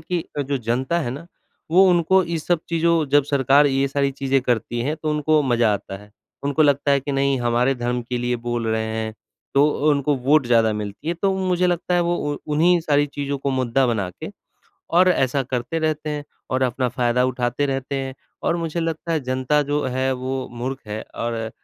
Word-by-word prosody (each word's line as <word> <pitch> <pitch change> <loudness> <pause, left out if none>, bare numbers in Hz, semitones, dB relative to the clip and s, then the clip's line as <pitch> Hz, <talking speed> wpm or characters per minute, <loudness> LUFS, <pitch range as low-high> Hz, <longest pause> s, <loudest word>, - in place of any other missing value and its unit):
कि 170 +1 -3 0.2
जो 140 +1 -1
जनता 130 +8 -1
है 120 -7 -2
ना, 145 +6 -7 0.4
वो 185 +4 +6
उनको 180 +2 +4
ये 170 -1 -2
सब 165 +1 0
चीज़ों 165 -1 +2
जब 145 +1 +4
सरकार 140 +1 +4
ये 135 0 +1
सारी 140 0 0
चीज़ें 135 0 0
करती 120 -1 -1
हैं, 150 +5 -2
तो 155 0 -3
उनको 150 0 +2
मज़ा 120 -5 +2
आता 95 -1 -4
है। 105 +1 -16 0.3
उनको 145 +2 +2
लगता 145 0 +2
है 140 0 +4
कि 140 +1 -4
नहीं 135 0 +1
हमारे 120 +3 +2
धर्म 120 0 -2
के 125 +1 -3
लिए 120 0 -1
बोल 120 -1 -1
रहे 110 0 0
हैं, 110 0 -3 0.4
तो 140 +1 +5 0.2
उनको 145 0 +1
वोट 135 +1 +3
ज़्यादा 115 -2 +3
मिलती 105 +7 -5
है, 170 - 0
तो 195 +3 0
मुझे 180 -1 +1
लगता 180 0 0
है 175 - +3
वो 170 -4 -1 0.2
उन्हीं 170 +4 +4
सारी 145 -2 +2
चीज़ों 140 -1 -4
को 140 +1 -2
मुद्दा 130 0 +1
बना 110 -6 -1
के - - -8 0.7
और 185 +1 +6
ऐसा 135 -5 +2
करते 125 +4 -3
रहते 155 -1 -1
हैं 145 -1 -4 0.3
और 130 0 0
अपना 125 0 0
फ़ायदा 125 0 +1
उठाते 125 +2 0
रहते 135 0 -3
हैं 135 -1 -3 0.3
और 170 - +1
मुझे 170 0 -3
लगता 165 0 -3
है 160 - +1
जनता 130 +3 0
जो 145 0 +1
है 130 +1 0
वो 130 +1 -4
मूर्ख 130 +3 -4
है 105 +1 -4
और 115 -1 -3
135 Hz, 205 wpm, -22 LUFS, 125-155 Hz, 0.7 s, वो